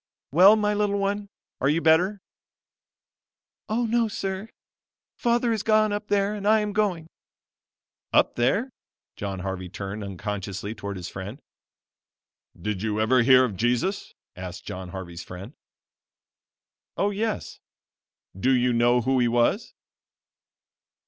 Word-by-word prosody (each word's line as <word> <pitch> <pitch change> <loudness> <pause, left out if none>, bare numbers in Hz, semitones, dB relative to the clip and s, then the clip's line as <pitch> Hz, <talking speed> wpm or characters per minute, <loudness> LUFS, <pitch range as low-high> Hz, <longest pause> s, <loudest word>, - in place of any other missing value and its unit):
"Well 185 +8 +8
my 210 -1 +1
little 205 -1 +1
one, 200 +1 -1 0.3
are 135 - +2
you 155 +3 +2
better?" 175 +5 +3 1.5
"Oh 235 +3 +1
no, 230 0 +2
sir; 195 0 -4 0.7
Father 235 0 +1
is 220 - -1
gone 215 -1 +3
up 210 0 -4
there 200 0 +1
and 205 -1 -4
I 220 0 +5
am 210 -1 -3
going." 195 -6 0 1.1
Up - - +4
there! 200 - +1 0.4
John 95 -2 -4
Harvey 95 -1 -4
turned 100 +3 -6
unconsciously 100 +1 -5
towards 100 -2 -6
his 90 - -6
friend. 100 +8 -7 1.2
"Did 100 +1 -3
you 110 -1 -1
ever 120 +3 +4
hear 130 +1 +6
of 110 -6 -4
Jesus?" 120 - -1 0.2
asked 90 -1 -8
John 90 0 -6
Harvey's 90 -2 -7
friend. 95 +8 -9 1.4
"Oh 205 - +1
yes." 215 +1 -3 0.8
"Do 110 +7 0
you 125 -1 +2
know 120 +1 +3
who 130 +2 +1
he 120 - +3
was?" 120 - +1
130 Hz, 130 wpm, -25 LUFS, -, 1.5 s, Well